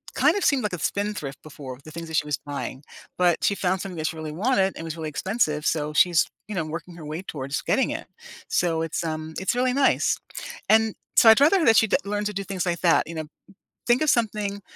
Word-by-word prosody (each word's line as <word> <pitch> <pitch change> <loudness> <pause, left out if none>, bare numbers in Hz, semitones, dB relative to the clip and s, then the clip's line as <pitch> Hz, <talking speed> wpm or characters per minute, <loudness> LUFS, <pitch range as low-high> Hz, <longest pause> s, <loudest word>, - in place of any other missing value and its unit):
kind - - +4
of 395 - -1
seemed 275 -3 +3
like 210 - -2
a 180 - -3
spend 205 +5 -1
thrift 140 -1 -6
before- 135 -4 -9
the 155 - -10
things 165 +1 -7
that 160 - -4
she - - +1
was 150 -2 -1
buying- 140 -1 -6 0.3
but 175 -2 +3
she 200 - +2
found 185 0 0
something 190 -2 -6
that 155 0 -1
she - - -4
really 155 -1 -6
wanted 195 +2 +1
and - - -7
was 165 0 -5
really 160 -1 -4
expensive. 155 -3 -1
So 150 -1 0
she's, 170 +2 +4 0.2
you 210 - -4
know, 165 -4 -1
working 165 +2 -7
her 155 - -9
way 155 +3 -5
towards 140 -5 -4
getting 265 - +1
it. - - -5 0.4
So 165 -2 +1
it's, 165 +1 -3
um 155 0 -4
it's 190 +5 0
really 250 +1 +2
nice, 275 +1 +2 0.5
and 220 0 +4 0.2
so 225 - +8
I'd 220 - +8
rather 340 +5 +5
that 225 - +6
she'd 220 - +4
that 280 - +1
learn 205 +1 -2
to 210 - -2
do 195 0 -3
things 190 -2 -3
like 170 -1 -1
that. 170 -2 +3
You 165 - -7
know? 155 -1 -4 0.6
Think 240 +3 +4
of 310 - +3
something 210 -4 0
180 Hz, 245 wpm, -25 LUFS, 155-210 Hz, 0.6 s, so